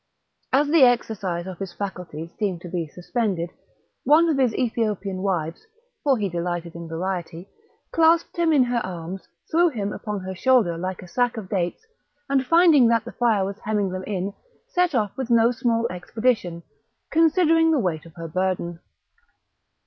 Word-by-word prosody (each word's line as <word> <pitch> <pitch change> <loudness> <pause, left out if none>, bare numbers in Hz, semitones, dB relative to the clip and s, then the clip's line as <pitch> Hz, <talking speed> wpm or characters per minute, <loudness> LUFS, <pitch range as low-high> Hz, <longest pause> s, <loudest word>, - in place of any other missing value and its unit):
As 285 +3 +3
the 315 +1 +4
exercise 210 -8 +2
of 185 -2 -8
his 195 -3 -5
faculties 175 -5 -6
seemed 190 -5 -1
to 175 - -8
be 170 -2 -3
suspended, 180 0 -2 0.5
one 315 +5 +5
of 305 - +1
his 255 -3 +3
Ethiopian 215 -6 -1
wives 175 - -2 0.4
(for 275 -3 +3
he 205 -2 -1
delighted 175 -1 -3
in 170 0 -8
variety) 175 +1 -4 0.4
clasped 330 0 +3
him 340 -2 +2
in 285 -4 +5
her 245 -1 0
arms, 180 +1 -6 0.2
threw 345 +2 +4
him 210 -7 -3
upon 210 -2 -4
her 190 0 -5
shoulder 220 -4 +3
like 185 +2 -4
a - - -11
sack 245 +6 0
of 200 -4 -6
dates, 180 - -2 0.4
and 275 -1 +2
finding 330 -5 +6
that 230 -1 +2
the 240 - -7
fire 220 -5 +2
was 200 +2 -6
hemming 210 -2 -1
them 185 0 -5
in, 195 -1 -2 0.4
set 355 -4 +1
off 210 -4 0
with 260 -2 -4
no 235 0 +5
small 235 -2 0
expedition, 180 -2 -1 0.5
considering 325 0 +4
the 320 - +3
weight 175 - -2
of 165 - -17
her 165 -1 -6
burden. 175 0 -2
205 Hz, 170 wpm, -24 LUFS, 180-255 Hz, 0.5 s, finding